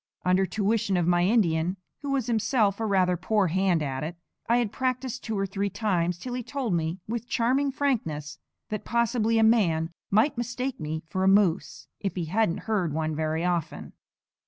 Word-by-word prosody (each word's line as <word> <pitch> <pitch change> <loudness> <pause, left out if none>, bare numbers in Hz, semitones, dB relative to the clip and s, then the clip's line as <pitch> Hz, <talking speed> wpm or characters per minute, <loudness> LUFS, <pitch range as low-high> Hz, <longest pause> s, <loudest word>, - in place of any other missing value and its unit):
Under 185 +1 +3
tuition 200 0 0
of 175 - +1
my 175 0 +3
Indian 180 -4 +2 0.2
(who 285 - -5
was 275 -4 0
himself 220 -3 +1
a 225 - -1
rather 185 -3 +3
poor 195 +2 +1
hand 180 -2 +2
at 135 -1 -3
it) 165 +3 -4 0.3
I 235 - +5
had 235 -4 0
practised 255 0 -2
two 220 -2 -3
or 195 - 0
three 200 +1 -2
times 180 -4 0
till 245 +7 -6
he 250 - -2
told 250 -4 -3
me, 165 +1 -1
with 235 +2 -4
charming 265 +4 +1
frankness, 185 - -2 0.3
that 215 - -3
possibly 235 -1 +1
a 225 - +4
man 170 -8 +3 0.2
might 230 +6 +2
mistake 250 +2 -3
me 155 +1 -4
for 185 +3 -2
a - - +3
moose, 195 -3 +2
if 195 - -3
he 175 -3 -2
hadn't 190 +1 0
heard 190 -8 -1
one 155 -1 -1
very 160 +2 -1
often. 170 -3 -2
200 Hz, 185 wpm, -27 LUFS, 170-235 Hz, 0.3 s, I